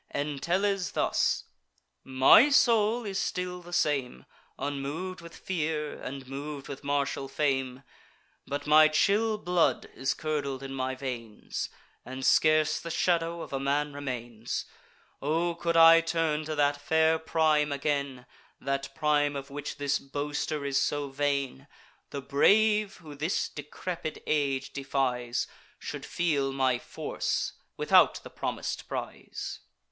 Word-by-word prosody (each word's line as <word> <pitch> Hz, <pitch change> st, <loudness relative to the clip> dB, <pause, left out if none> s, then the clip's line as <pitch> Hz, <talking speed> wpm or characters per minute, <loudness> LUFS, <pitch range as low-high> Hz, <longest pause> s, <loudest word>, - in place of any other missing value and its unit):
Entellus, 175 Hz, +7 st, 0 dB
thus: -, -, +1 dB, 0.6 s
"My 135 Hz, -, +6 dB
soul 230 Hz, -4 st, +4 dB
is 195 Hz, -1 st, -2 dB
still 180 Hz, 0 st, -3 dB
the 175 Hz, 0 st, -12 dB
same, 135 Hz, -, 0 dB, 0.3 s
Unmov'd 145 Hz, +7 st, -4 dB
with 170 Hz, -1 st, -11 dB
fear, 155 Hz, -4 st, -3 dB
and 135 Hz, 0 st, -7 dB
mov'd 140 Hz, +1 st, -6 dB
with 140 Hz, 0 st, -8 dB
martial 140 Hz, -1 st, -1 dB
fame; 135 Hz, -2 st, -1 dB, 0.6 s
But 145 Hz, 0 st, -3 dB
my 155 Hz, +1 st, +7 dB
chill 210 Hz, +8 st, +2 dB
blood 180 Hz, -4 st, +1 dB
is 135 Hz, +1 st, -1 dB
curdled 140 Hz, -4 st, -3 dB
in 135 Hz, 0 st, -6 dB
my 130 Hz, 0 st, -2 dB
veins, 120 Hz, -5 st, -5 dB, 0.3 s
And 130 Hz, +1 st, -6 dB
scarce 155 Hz, -1 st, +4 dB
the 170 Hz, -, -7 dB
shadow 170 Hz, 0 st, 0 dB
of -, -, -10 dB
a 135 Hz, -, 0 dB
man 145 Hz, +2 st, 0 dB
remains. 120 Hz, -5 st, -4 dB, 0.6 s
O 165 Hz, +4 st, +1 dB
could 170 Hz, 0 st, -1 dB
I 165 Hz, 0 st, +9 dB
turn 165 Hz, -2 st, 0 dB
to 155 Hz, 0 st, -3 dB
that 145 Hz, -1 st, +1 dB
fair 160 Hz, +2 st, +3 dB
prime 155 Hz, -2 st, +2 dB
again, 140 Hz, -3 st, -2 dB, 0.3 s
That 135 Hz, 0 st, -3 dB
prime 145 Hz, -1 st, +2 dB
of 140 Hz, 0 st, -6 dB
which 145 Hz, +1 st, -5 dB
this 145 Hz, -1 st, 0 dB
boaster 145 Hz, +1 st, -3 dB
is 140 Hz, 0 st, +1 dB
so 145 Hz, -1 st, -1 dB
vain, 140 Hz, -1 st, -1 dB, 0.4 s
The 140 Hz, -1 st, -6 dB
brave, 210 Hz, +9 st, +3 dB
who 155 Hz, -4 st, -11 dB
this 155 Hz, +5 st, -1 dB
decrepid 155 Hz, +2 st, -6 dB
age 140 Hz, -3 st, 0 dB
defies, 125 Hz, -3 st, -1 dB, 0.3 s
Should -, -, -7 dB
feel 145 Hz, -6 st, 0 dB
my 130 Hz, -2 st, +1 dB
force, -, -, -3 dB, 0.2 s
without -, -, +5 dB
the -, -, -10 dB
promis'd -, -, -4 dB
prize." -, -, -6 dB
145 Hz, 130 wpm, -29 LUFS, 135-165 Hz, 0.6 s, I